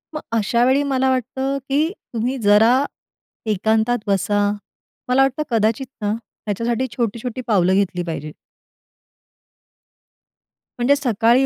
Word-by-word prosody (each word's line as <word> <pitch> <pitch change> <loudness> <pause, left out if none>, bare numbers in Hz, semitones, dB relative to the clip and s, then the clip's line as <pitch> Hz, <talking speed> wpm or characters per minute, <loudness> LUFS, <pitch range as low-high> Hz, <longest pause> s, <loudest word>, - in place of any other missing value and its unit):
मग 305 - -3 0.2
अशावेळी 245 +6 +2
मला 265 -2 +1
वाटतं, 265 +2 -1
की 300 +5 +2 0.2
तुम्ही 240 +4 -1
जरा 220 +6 +5 0.7
एकांतात 220 +4 +1
बसा. 205 +1 +1 0.6
मला 255 +2 +4
वाटतं 270 +2 +1
कदाचित 230 +2 +1
ना, 205 -1 0
ह्याच्यासाठी 230 +2 -3
छोटी-छोटी 235 +1 -2
पावलं 190 -5 +3
घेतली 185 -2 0
पाहिजे. 155 -3 -5 2.5
म्हणजे 255 +4 +4
सकाळी 245 -1 +3
235 Hz, 105 wpm, -20 LUFS, 205-260 Hz, 2.5 s, जरा